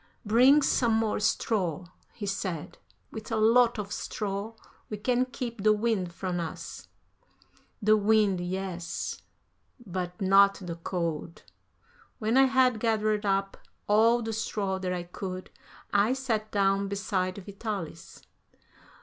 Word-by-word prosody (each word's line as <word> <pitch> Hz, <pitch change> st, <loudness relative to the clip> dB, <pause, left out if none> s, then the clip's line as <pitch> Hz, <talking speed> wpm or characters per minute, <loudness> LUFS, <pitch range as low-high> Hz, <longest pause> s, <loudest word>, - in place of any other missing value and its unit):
"Bring 255 Hz, +7 st, +6 dB
some 235 Hz, -5 st, +2 dB
more 220 Hz, -1 st, +1 dB
straw," 195 Hz, -6 st, 0 dB, 0.3 s
he 215 Hz, -, -6 dB
said; 190 Hz, -5 st, -4 dB, 0.3 s
"with 220 Hz, +1 st, -8 dB
a -, -, +1 dB
lot 230 Hz, +2 st, +4 dB
of 205 Hz, -1 st, -5 dB
straw 210 Hz, +2 st, -4 dB, 0.3 s
we 210 Hz, -, -4 dB
can 250 Hz, +4 st, +1 dB
keep 240 Hz, -3 st, -6 dB
the 215 Hz, +1 st, +5 dB
wind 210 Hz, -5 st, 0 dB
from 180 Hz, 0 st, -3 dB
us." 165 Hz, -1 st, -6 dB, 1.0 s
The 215 Hz, +1 st, +6 dB
wind, 210 Hz, -3 st, +3 dB
yes, 180 Hz, -2 st, -4 dB, 0.6 s
but 180 Hz, -2 st, -4 dB
not 195 Hz, +1 st, +5 dB
the 175 Hz, -3 st, -7 dB
cold. 170 Hz, -2 st, -4 dB, 0.7 s
When 220 Hz, +2 st, 0 dB
I 270 Hz, 0 st, +7 dB
had 260 Hz, -3 st, +3 dB
gathered 215 Hz, -2 st, +1 dB
up 195 Hz, 0 st, 0 dB, 0.3 s
all 230 Hz, +3 st, +4 dB
the 225 Hz, 0 st, -3 dB
straw 205 Hz, -3 st, -2 dB
that 185 Hz, -1 st, -2 dB
I 180 Hz, -1 st, -2 dB
could, 185 Hz, +1 st, -7 dB, 0.4 s
I 205 Hz, +4 st, +4 dB
sat 230 Hz, -5 st, -2 dB
down 195 Hz, 0 st, +2 dB
beside 195 Hz, -2 st, -2 dB
Vitalis. 200 Hz, -4 st, -6 dB
205 Hz, 130 wpm, -28 LUFS, 185-225 Hz, 1.0 s, I